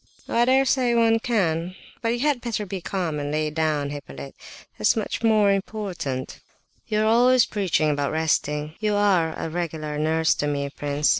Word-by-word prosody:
"Oh, - - -4
I 235 +1 +4
dare 265 +2 +4
say 250 -3 +2
one 225 -1 +4
can; 185 -7 -1 0.3
but 230 - 0
you 240 +1 -1
had 285 -4 +1
better 225 -3 -3
be 190 -1 -5
calm 170 -5 -2
and 145 0 -3
lie 155 0 -1
down, 150 -2 -1
Hippolyte—that's 90 - -4
much 220 0 -3
more 215 -3 +4
important." 190 -10 -4 0.5
"You 215 -1 0
are - - +2
always 245 +2 +5
preaching 180 -7 0
about 145 -1 -1
resting; 150 -1 -1
you 210 -1 0
are 185 -6 +2
a - - -3
regular 155 -3 -4
nurse 160 +1 +2
to 145 - -2
me, 140 -1 -2
prince. 145 +1 -1
175 Hz, 175 wpm, -24 LUFS, 150-220 Hz, 0.5 s, always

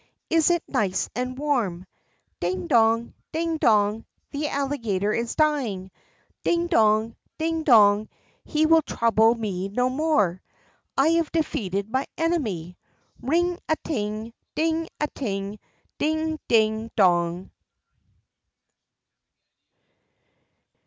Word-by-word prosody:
Is 325 0 +4
it 345 -1 +1
nice 195 -3 -1
and 255 +1 -3
warm? 235 -12 -1 0.5
Ding 180 - -2
dong! 230 -5 +2 0.2
ding 330 0 -1
dong! 215 -4 +2 0.2
The 295 +1 -2
Alligator 230 -9 -1
is 235 0 -2
dying! 250 - 0 0.5
ding 340 0 +1
dong, 220 -7 +2 0.2
ding 325 0 -1
dong! 215 -7 +5 0.3
He 310 0 +1
will 325 0 +5
trouble 230 -4 +2
me 195 -4 -3
no 250 +5 +1
more. 255 - +1 0.6
I 275 +4 +4
have 330 -1 +1
defeated 200 - -1
my 260 +2 -1
enemy! 215 - -2 0.4
Ring 345 +7 +1
a 315 - +3
ting! 215 -3 -3 0.2
ding 325 +1 0
a 300 - +1
ting! 205 -7 -4 0.4
ding 315 +1 -1
ding 220 0 +2
dong!" 175 -2 +2
235 Hz, 105 wpm, -24 LUFS, 205-310 Hz, 0.6 s, dong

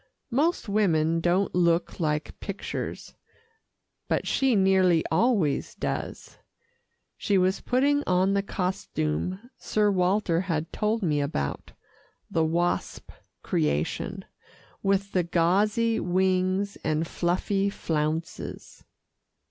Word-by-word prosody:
Most 295 +3 +1
women 165 -6 +2
don't 180 +4 +1
look 170 0 +1
like 150 -2 -1
pictures, 200 -1 -5 0.9
but - - 0
she 265 -3 +2
nearly 190 -4 +4
always 170 - +1
does. - - -5 0.8
She 200 - +1
was 185 +1 +2
putting 280 +3 +2
on 185 +2 +3
the 200 - +2
costume 185 - -3
Sir 210 -1 +1
Walter 180 -2 +1
had 165 -4 -3
told 215 +1 0
me 150 -4 +1
about 70 - -3 0.6
the 165 - +2
wasp 170 +2 -1 0.3
creation, 75 0 -1 0.6
with 195 0 +1
the 185 - +2
gauzy 205 +7 +2
wings 185 +2 +1
and 155 +1 0
fluffy 195 +4 0
flounces. 160 0 -4
185 Hz, 100 wpm, -26 LUFS, 165-200 Hz, 0.9 s, nearly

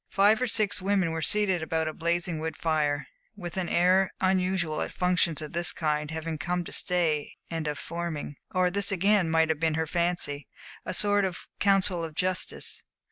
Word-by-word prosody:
Five 205 +4 +3
or 255 - +1
six 215 -4 +1
women 190 -3 +1
were 160 0 -3
seated 190 0 +2
about 160 0 -1
a 155 - -3
blazing 170 0 -1
wood 160 +1 -4
fire, 150 -3 0 0.3
with 175 -5 -7
an 185 -2 -2
air 185 +2 +3
unusual 185 -4 0
at - - -3
functions 180 -3 +1
of 150 - -8
this 170 +1 +4
kind 150 -1 -1
of - - -6
having 160 -1 -4
come 175 +2 -2
to - - -9
stay 165 -5 +1 0.2
and 165 -2 -3
of 150 -1 -2
forming 170 -4 -5
or 185 -1 +1
this 200 +2 +2
again 195 -1 +2
might 160 0 +2
have 160 -2 0
been 160 -1 +1
her 160 0 0
fancy 170 -4 -1 0.4
a - - -1
sort 205 +1 +3
of 185 -3 -4
council 195 -3 +2
of 160 -2 -6
justice. 185 +1 -2
170 Hz, 190 wpm, -27 LUFS, 160-185 Hz, 0.4 s, this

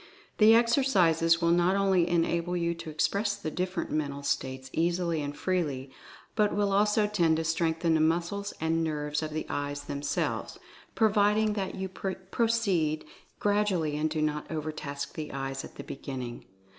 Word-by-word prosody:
The 220 +1 +8
exercises 185 - +3
will 170 - +4
not 175 +2 +3
only 190 -3 +3
enable 170 +1 +1
you 170 0 0
to 165 -1 -8
express 200 +7 0
the 155 - -5
different 185 +3 -3
mental 140 -2 -2
states 130 -2 -2
easily 170 -1 0
and 145 0 -5
freely, 145 -8 -1 0.4
but 210 -1 +2
will 200 -1 +1
also 210 +1 +3
tend 170 -6 +2
to 160 - -1
strengthen 165 0 +1
the 160 - +3
muscles 175 +5 0
and 165 +1 +1
nerves 150 -1 -2
of 155 - -3
the 155 +1 -3
eyes 145 0 -3
themselves, 145 0 -2 0.4
pro 220 -1 +4
viding 210 +1 +3
that 195 -2 -3
you 190 0 -3
proceed 190 -3 -1 0.3
gradually 205 -7 +1
and 155 +1 0
do 155 0 -1
not 150 0 -2
overtask 150 -3 -4
the 155 -1 -5
eyes 135 0 -4
at - - -11
the - - -7
beginning. 130 -3 -6
165 Hz, 160 wpm, -29 LUFS, 150-195 Hz, 0.4 s, The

